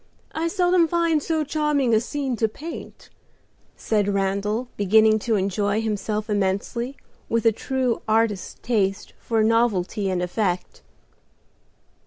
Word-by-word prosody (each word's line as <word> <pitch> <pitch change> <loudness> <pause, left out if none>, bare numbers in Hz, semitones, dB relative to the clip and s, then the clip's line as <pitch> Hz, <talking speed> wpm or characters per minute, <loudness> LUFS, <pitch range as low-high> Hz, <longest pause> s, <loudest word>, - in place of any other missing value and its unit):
I 325 +1 -1
seldom 355 -1 +3
find 335 -2 +1
so 315 +1 0
charming 290 -4 +1
a 220 - +5
scene 270 +1 -3
to 225 - +2
paint," 315 +10 -9 0.6
said 210 -2 0
Randal, 200 +4 -1
beginning 215 +2 +4
to 225 +1 0
enjoy 200 +2 0
himself 215 -1 -2
immensely, 210 +6 -1 0.3
with 230 -1 0
a 225 - +6
true 255 +1 -1
artist's 220 -3 +1
taste 200 -5 0
for 225 -2 0
novelty 215 -3 +1
and 180 -1 -1
effect. 180 -1 -2
220 Hz, 125 wpm, -23 LUFS, 205-265 Hz, 0.6 s, a